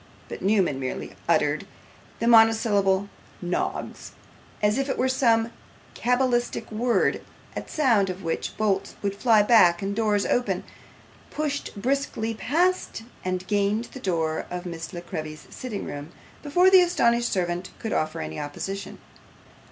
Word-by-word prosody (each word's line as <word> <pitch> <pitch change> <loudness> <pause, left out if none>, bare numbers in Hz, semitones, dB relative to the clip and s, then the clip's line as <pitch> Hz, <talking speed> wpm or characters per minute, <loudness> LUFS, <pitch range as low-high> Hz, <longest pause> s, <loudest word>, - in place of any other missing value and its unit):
But - - -7
Newman 190 -8 +2
merely 130 -1 -5
uttering - - +2 0.5
the 230 - -2
monosyllable 220 -4 +4 0.3
'Noggs,' 175 0 -3 0.5
as 210 +4 +2
if 275 +1 -1
it - - -1
were 255 - +2
some 230 -3 +2 0.4
cabalistic 245 -2 0
word, 235 +3 +1 0.3
at - - -6
sound 230 -10 +2
of 185 +1 -6
which 165 -1 -3
bolts 200 -2 0
would 200 0 -1
fly 220 -1 +4
back 185 -6 +5
and 200 +1 -2
doors 210 -2 +1
open, 245 0 0 0.7
pushed 285 -8 -3
briskly 245 -2 -1
past 330 +3 0 0.2
and 185 0 -2
gained 205 +3 0
the 265 - -7
door 165 -7 -1
of 180 0 -5
Miss 165 -2 -6
La 175 - -6
Creevy's 155 -4 -7
sitting 235 -6 -5
room, 145 +3 -7 0.3
before 355 +6 +4
the 375 -1 +9
astonished 240 -9 +2
servant 180 -1 -1
could 225 - -4
offer 155 - -1
any 80 0 -5
opposition. 195 +7 -5
210 Hz, 140 wpm, -25 LUFS, 180-240 Hz, 0.7 s, the